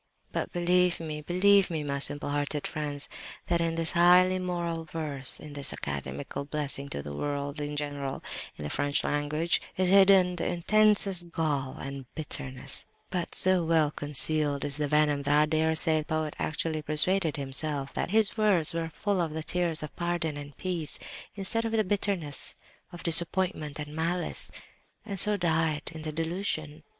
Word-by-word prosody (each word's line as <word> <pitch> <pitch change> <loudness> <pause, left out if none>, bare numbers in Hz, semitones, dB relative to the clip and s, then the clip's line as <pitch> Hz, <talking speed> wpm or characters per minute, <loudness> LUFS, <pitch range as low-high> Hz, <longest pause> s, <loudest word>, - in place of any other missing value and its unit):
"But - - -3
believe 180 0 +2
me, 155 -2 -5
believe 195 +4 +4
me, 160 -3 -3
my 140 -1 -2
simple 145 +1 0
hearted 145 0 -2
friends, 145 -2 -4 0.4
that 170 -1 0
in 165 -1 0
this 165 -1 +4
highly 180 +2 +5
moral 170 -2 -3
verse, 155 -5 -4
in 150 -1 -10
this 140 -1 +1
academical 70 - -5
blessing 140 -1 -3
to 70 - -5
the 75 - -7
world 145 - -3
in 145 0 -4
general 145 -2 -4 0.3
in - - -9
the 75 - -4
French 145 0 0
language, 150 +3 0 0.2
is 185 -1 +2
hidden 190 -2 +6
the - - -2
intensest 195 0 +2
gall 145 -5 -2
and 135 -2 -7
bitterness; 135 -4 -3 0.2
but 180 -3 -3
so 185 -1 +3
well 160 -2 +2
concealed 145 0 +2
is 145 -1 -3
the 150 -1 -1
venom, 150 -1 +2
that 145 +1 +2
I - - +4
dare 160 +1 +1
say 160 0 +2
the 155 - -5
poet 155 -1 -2
actually 155 0 -2
persuaded 155 +3 +3
himself 140 0 0
that - - -2
his 215 +1 +3
words 205 -8 +2
were 165 -1 -2
full 195 +4 -1
of 160 -3 -2
the 160 0 -4
tears 170 -2 -1
of 150 - -8
pardon 175 -3 -2
and 145 -1 -9
peace, 175 -5 -1 0.4
instead 205 +3 +1
of 225 0 -3
the 220 -1 +3
bitterness 190 -7 -2 0.4
of 175 - -10
disappointment 170 -2 +4
and 150 0 -7
malice, 170 +2 0 0.6
and 200 -3 -2
so 210 +2 +4
died 160 -3 0
in 160 - -8
the 155 0 -4
delusion. 160 -2 -3
160 Hz, 170 wpm, -28 LUFS, 145-180 Hz, 0.6 s, hidden